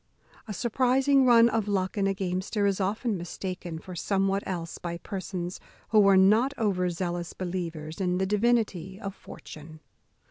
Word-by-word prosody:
A 210 - -4
surprizing 260 +4 +3
run 235 -1 +7
of 225 -3 0
luck 190 -2 -1
in 200 -2 +1
a 195 - +1
gamester 190 +2 -1
is 200 0 +1
often 210 +2 -1
mistaken 175 -1 -5
for 180 +3 -9
somewhat 195 +3 0
else 170 -3 -4
by 170 -1 -4
persons 185 -1 -5 0.3
who 210 -2 +5
are 195 -1 +6
not 220 +9 +4
over 185 -5 +1
zealous 175 0 -3
believers 170 -3 -5
in 180 -1 +1
the 190 - +1
divinity 205 -3 0
of 200 -3 -5
fortune. 155 -4 -12
190 Hz, 155 wpm, -27 LUFS, 180-210 Hz, 0.3 s, run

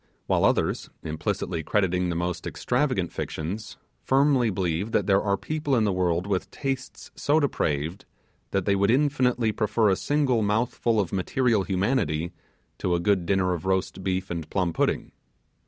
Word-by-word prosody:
While - - +2
others, - - +1
implicitly 80 +2 -2
crediting 90 0 +1
the 85 - -2
most 85 +1 -2
extravagant - - 0
fictions, 95 +8 -5 0.3
firmly 135 -3 +3
believe 95 +2 -1
that - - +2
there 100 -1 +3
are 100 -1 +1
people 150 0 -1
in 115 - +3
the 100 -2 +1
world 90 -1 +1
with 100 -2 -1
tastes 135 -2 -5
so 150 +2 +2
depraved 80 - -1 0.4
that 95 -2 -1
they 100 - +3
would 100 +1 +2
infinitely 125 -4 +2
prefer 110 0 +1
a 95 - +3
single 140 -1 +1
mouthful 110 +2 +1
of 100 -3 -1
material 110 +3 +1
humanity 95 - 0 0.5
to 90 -2 +1
a - - 0
good 90 -1 +1
dinner 95 -1 +2
of 90 +1 -5
roast 95 0 -1
beef 95 0 -2
and 85 -3 -4
plum 90 -3 0
pudding. - - 0
100 Hz, 160 wpm, -26 LUFS, 90-120 Hz, 0.5 s, firmly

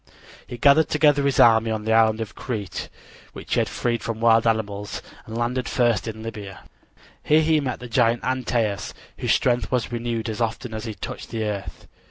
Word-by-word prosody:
He 120 - -7
gathered 145 +5 +5
together 150 -1 +4
his 140 -1 +1
army 115 -1 +6
on 110 -1 -3
the 110 - +2
island 110 0 +4
of 110 - -5
Crete, 110 -6 -5 0.4
which - - -6
he - - +3
had - - 0
freed 120 -1 -1
from 115 -1 -4
wild 115 0 +4
animals, 105 -2 -2 0.2
and 110 +1 -6
landed 120 +1 -1
first 120 -2 +1
in 110 0 -6
Libya. 105 -4 -8 0.6
Here 155 +1 +3
he 155 0 +3
met 130 -5 -3
the 125 - -8
giant 115 0 +2
Antaeus, 115 -6 -1 0.2
whose - - +2
strength 120 0 +1
was 125 -2 0
renewed 120 -1 -3
as 110 +1 -4
often 115 +1 -2
as 110 +1 -5
he 110 -2 -5
touched - - -7
the 115 -1 -3
earth. 105 -2 -5
115 Hz, 195 wpm, -23 LUFS, 110-125 Hz, 0.6 s, army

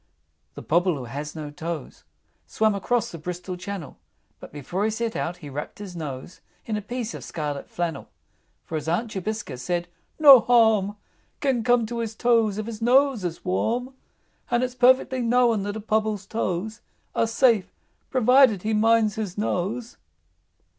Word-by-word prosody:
II. 75 0 -46
The - - -8
Pobble 175 0 +2
who 130 - -6
has 145 +6 -6
no 150 -2 -6
toes, 160 -1 -6 0.4
Swam 220 -1 +1
across 235 +4 -1
the 165 - -8
Bristol 180 +3 -5
Channel; 185 - -7 0.4
But - - -11
before 150 +7 -4
he 220 - +2
set 225 +1 -3
out 175 +1 -3
he 150 - -10
wrapped 145 +2 -6
his 200 -3 -8
nose 150 0 -7 0.2
In 220 - -2
a 210 - -2
piece 240 +2 -4
of - - -8
scarlet 145 -3 -5
flannel. 170 -5 -4 0.6
For 160 - -3
his 150 0 -6
Aunt 215 +7 -1
Jobiska 200 - -4
said, 175 +5 -2 0.3
"No 280 -4 +10
harm 220 -4 +3 0.4
Can 265 -5 0
come 245 -1 +3
to 235 +1 -5
his 225 -1 -3
toes 230 -4 +2
if 215 - -3
his 230 -1 -7
nose 255 -1 +3
is 170 -2 -5
warm; 240 +8 -1 0.6
And 240 +1 +2
it's 250 -1 -2
perfectly 255 +1 +3
known 235 -2 +3
that 205 +1 -4
a - - -5
Pobble's 215 -2 -1
toes 215 0 -3 0.3
Are 230 - +1
safe 225 -4 +2 0.4
provided 250 -5 +4
he 220 +1 0
minds 220 0 +3
his 210 -4 -4
nose." 220 +5 -2
210 Hz, 170 wpm, -24 LUFS, 175-235 Hz, 0.6 s, No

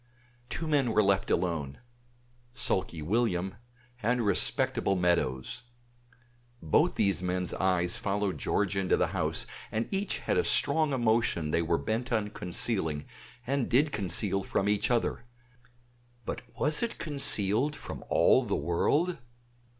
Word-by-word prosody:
Two 160 +6 -4
men 140 -6 +1
were 110 - +4
left 100 0 +1
alone; 80 -6 -1 0.8
sulky 85 -10 -1
William 95 -1 -1 0.4
and 120 +1 0
respectable 100 -1 +2
Meadows. 85 -8 0 1.0
Both 80 - +2
these 100 -3 +1
men's 90 0 -2
eyes 90 -2 +1
followed 100 -1 -2
George 100 -1 0
into 95 -1 +1
the - - +1
house, - - -1 0.3
and 110 +1 -2
each 200 +1 0
had - - -1
a - - +2
strong 155 -2 +2
emotion 115 - +1
they 85 - +2
were 85 0 +1
bent 120 +3 -3
on 110 -3 0
concealing, 85 -6 -2 0.4
and 135 0 -1
did 145 +5 +3
conceal 100 -1 0
from 95 +1 -1
each 105 0 +1
other; 120 -1 0 1.0
but - - -4 0.2
was 150 +1 +4
it 235 -1 -2
concealed 140 -3 +2
from - - -8
all - - +4
the - - -2
world? 145 - 0
100 Hz, 135 wpm, -29 LUFS, 90-120 Hz, 1.0 s, were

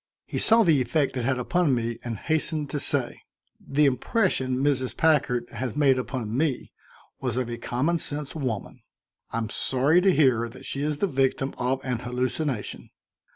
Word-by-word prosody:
He - - -3
saw 225 +1 +5
the 155 -8 +4
effect 135 +3 0
it 125 -2 -2
had 130 0 +1
upon 150 +3 +1
me 115 -1 -3
and 115 -2 -4
hastened 155 +2 -1
to 145 - -2
say: 135 -3 -1 0.4
"The 145 +2 +1
impression 135 - +1
Mrs. 135 -2 0
Packard 135 -7 +2
has 120 0 -4
made 135 -3 +3
upon 120 -4 -4
me 145 -1 -1 0.5
was - - -2
of 130 -2 0
a 120 - -5
common 145 +9 0
sense 145 -2 -5
woman. 125 -10 -4 0.5
I'm 115 -1 -3
sorry 140 +7 +3
to 195 +1 +4
hear 125 -8 +3
that 120 - -13
she 140 - -4
is 150 0 -1
the 200 - +1
victim 135 -2 0
of 130 +2 0
an 125 -3 -1
hallucination. 125 0 -3
135 Hz, 170 wpm, -26 LUFS, 125-150 Hz, 0.5 s, saw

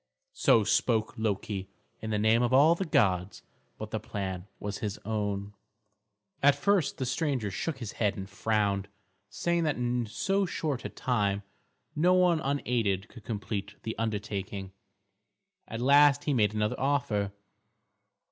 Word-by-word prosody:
So 110 - +4
spoke 110 +1 +1
Loki, 100 -2 -2 0.3
in 110 - -5
the 105 - 0
name 110 +3 +3
of 120 0 +1
all 145 +5 +6
the 185 +3 -2
gods; 95 - +1 0.3
but 110 0 -7
the 110 - -1
plan 95 -3 -5
was 105 0 -4
his 105 -2 -3
own. 105 -2 -2 0.9
At 140 0 +6
first 175 +2 +1
the 130 - -2
stranger 130 - -1
shook 145 - -3
his 115 -5 -6
head 105 -3 0
and 95 0 -5
frowned, 100 -1 0 0.4
saying 170 +8 0
that 150 - +1
in 120 -1 -1
so 195 - 0
short 145 -7 -2
a - - -2
time 105 -5 0 0.5
no 175 +4 +4
one 180 -3 +4
unaided 115 - -1
could 115 - -13
complete 105 -2 -4
the 110 - -3
undertaking. 100 -3 -3 1.0
At 115 +1 -5
last 145 +2 +6
he 150 - 0
made 110 -4 +2
another 105 0 0
offer. 120 -8 0
110 Hz, 145 wpm, -29 LUFS, 100-140 Hz, 1.0 s, all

